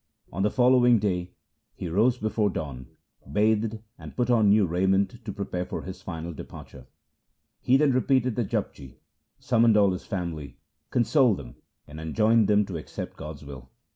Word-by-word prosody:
On 95 - -2
the 105 - +3
following 125 0 +4
day 90 -4 -2 0.4
he 90 - -5
rose 110 +9 +2
before 110 -2 0
dawn, 70 -8 -6 0.4
bathed, 110 +1 +1 0.2
and - - -10
put 125 -1 +1
on 110 -4 +4
new 105 0 +5
raiment 95 +6 0
to 105 - -5
prepare 95 -2 -4
for - - -6
his 95 0 -8
final 85 -1 -6
departure. 65 -3 -11 0.7
He 130 - +3
then 145 -1 +3
repeated 130 -2 +1
the 120 - 0
Japji, 70 -9 -4 0.4
summoned 115 -2 +3
all 100 -2 +4
his 90 - -6
family, 85 -6 -5 0.3
consoled 125 - +3
them, - - -11 0.3
and 75 +1 -10
enjoined 110 +6 +2
them 105 0 +3
to 95 -3 -5
accept 75 - -7
God's 75 -1 -9
will. 65 -2 -10
100 Hz, 165 wpm, -26 LUFS, 85-115 Hz, 0.7 s, new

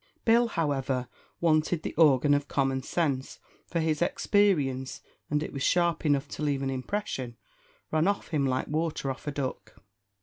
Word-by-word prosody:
Bill, 235 +1 +5
however, 135 - -1 0.3
wanted 160 0 +2
the - - -4
organ 145 -3 +5
of 145 0 +1
common 135 -2 0
sense; 135 -3 -1 0.3
for 170 - -2
his 160 -1 0
experience 150 -10 +1 0.3
and 150 +1 +1
it - - -6
was 140 - -5
sharp 170 +1 +2
enough 145 0 +2
to - - -7
leave 140 -2 0
an 135 - -1
impression 130 - -4 0.5
ran 155 +3 +2
off 200 0 -1
him 145 -4 +1
like 130 0 -1
water 155 -3 -1
off 135 - -9
a - - 0
duck. 130 -6 -5
145 Hz, 165 wpm, -28 LUFS, 135-165 Hz, 0.5 s, Bill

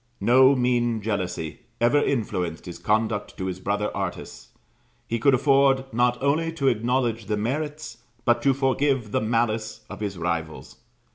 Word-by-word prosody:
No 130 +3 +5
mean 120 -2 +1
jealousy 95 -7 -3 0.2
ever 120 +5 +4
influenced 90 - -2
his 85 - -8
conduct 110 -1 -1
to 95 - -4
his 95 -1 -4
brother 105 +2 -2
artists; - - -5 0.6
he 115 - -2
could 135 +4 +4
afford 135 -1 +3
not 120 +1 +2
only 160 +4 +1
to 140 -5 +2
acknowledge 120 -2 0
the 105 - -1
merits, 150 +7 -3 0.3
but 120 -1 +3
to 135 +1 +3
forgive 135 -3 0
the - - +1
malice, 110 -1 -1
of - - -7
his 100 -3 -4
rivals. 85 -2 -4
120 Hz, 150 wpm, -24 LUFS, 105-135 Hz, 0.6 s, No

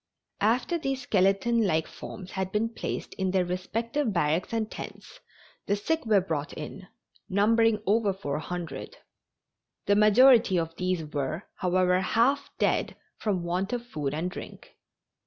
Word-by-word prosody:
After 250 - +1
these 270 -3 -2
skeleton 195 +3 +2
like 160 -5 +1
forms 185 -3 -9
had 190 -1 -3
been 215 +3 0
placed 230 - -5
in 190 0 +1
their 185 -1 +2
respective 225 +8 -2
barracks 170 -1 0
and 225 -2 -1
tents - - -9 0.5
the 200 - +2
sick 285 +6 -1
were 210 -2 +5
brought 160 -4 -3
in, 155 +4 -8 0.4
numbering 215 +2 +3
over 210 0 +3
400. 175 -1 -5 0.9
The 200 - +3
majority 215 -1 +6
of 165 -1 -2
these 180 -3 -1
were, 150 +4 -3
however, 180 0 +2
half 265 +8 +2
dead - - +1 0.2
from 195 -5 -1
want 180 +6 -1
of 240 -1 -3
food 150 - -3
and 175 +4 -2
drink. - - -10
195 Hz, 140 wpm, -27 LUFS, 180-225 Hz, 0.9 s, majority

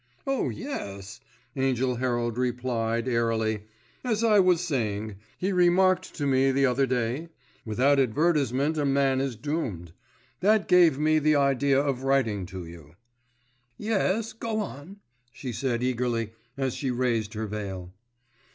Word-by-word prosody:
"Oh, 270 -1 0
yes," 100 - -6 0.4
Angell 130 -2 0
Herald 120 -2 -1
replied, 120 -2 -1
airily. 110 -3 0 0.4
"As 230 -3 0
I 215 -3 +5
was 180 -3 +4
saying, 110 - -2 0.2
he 190 +2 -1
remarked 185 +1 +3
to 145 - -2
me 135 0 +3
the 135 +1 +2
other 135 +1 +2
day, 125 +6 -1 0.4
'Without 130 +6 +2
advertisement 145 +2 +1
a - - +1
man 135 -1 +2
is 135 -3 -2
doomed.' 110 - -4 0.5
That 210 +2 +3
gave 175 -6 +5
me 155 +1 +3
the 155 0 +3
idea 140 -1 +3
of 140 -3 -1
writing 130 -9 +1
to 95 -2 -7
you." 85 -2 -13 0.8
"Yes, 215 0 0
go 225 -1 -3
on," 185 -1 -7 0.3
she 130 0 -6
said 120 0 -1
eagerly, 120 -3 -1 0.3
as 135 -2 -1
she 135 - -3
raised 120 -3 -1
her 110 +1 -2
veil. 95 -4 -6
130 Hz, 140 wpm, -27 LUFS, 115-155 Hz, 0.8 s, I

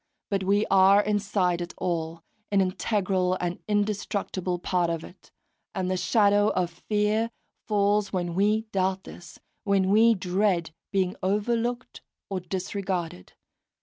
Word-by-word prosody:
But 195 -1 0
we 205 +2 +3
are 195 +1 +6
inside 200 -4 0
it 175 - -6
all, 165 -1 -3 0.3
an 200 - +3
integral 185 -1 0
and 175 0 -3
indestructible 205 -3 -1
part 175 -1 0
of 165 -1 -3
it; 185 - -14 0.5
and 185 -1 -1
the - - +1
shadow 205 +1 +3
of 180 -2 0 0.2
fear 210 +2 +1 0.4
falls 205 -1 +2
when 175 -2 -2
we 210 +4 +2
doubt 190 0 0
this, 175 -2 -12 0.3
when 195 -2 +2
we 225 +2 +5
dread 185 -3 0 0.2
being 190 -2 0
overlooked 230 +5 -1 0.3
or 190 - -1
disregarded. 180 - -4
195 Hz, 130 wpm, -26 LUFS, 180-205 Hz, 0.5 s, are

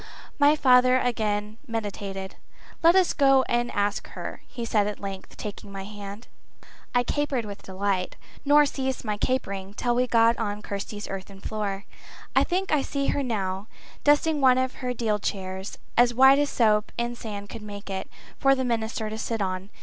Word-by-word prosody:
My 290 +1 +6
father 255 -2 +5
again 215 -3 -1
meditated. 200 -4 -4 0.5
"Let 335 +2 +6
us 375 -2 +4
go 270 -2 +5
and 240 -1 0
ask 205 0 -1
her," - - -7
he 235 -2 -5
said 210 -3 +2
at 210 - -4
length, 195 -1 -7
taking 205 -1 -7
my 195 -1 -6
hand. 205 +2 -8 0.7
I 245 - +4
capered 275 -3 -1
with 200 -1 -8
delight, 190 -1 -2 0.3
nor 295 +1 +6
ceased 265 -3 -3
my 210 -1 0
capering 200 -5 -2
till 240 +1 0
we 250 +1 +2
stood 230 -1 +4
on 210 -1 -3
Kirsty's 205 +1 -5
earthen 195 0 -7
floor. 200 -1 -3 0.5
I - - +6
think 375 +2 -1
I 300 -2 +3
see 275 0 -1
her 285 - +1
now, 200 -5 -2 0.4
dusting 295 +1 +3
one 255 -1 +6
of 260 0 0
her 250 -1 -1
deal 220 -3 0
chairs, 190 -1 -4 0.2
as 240 0 +4
white 265 +2 +7
as 290 -1 +1
soap 215 -2 +2
and 235 0 -1
sand 205 -3 -7
could 230 - -8
make 205 -1 -8
it, 190 - -4 0.3
for 275 -1 +5
the 260 -1 -1
minister 225 -2 -1
to 220 +1 -5
sit 225 0 -2
on. 190 0 -2
220 Hz, 180 wpm, -26 LUFS, 200-255 Hz, 0.7 s, white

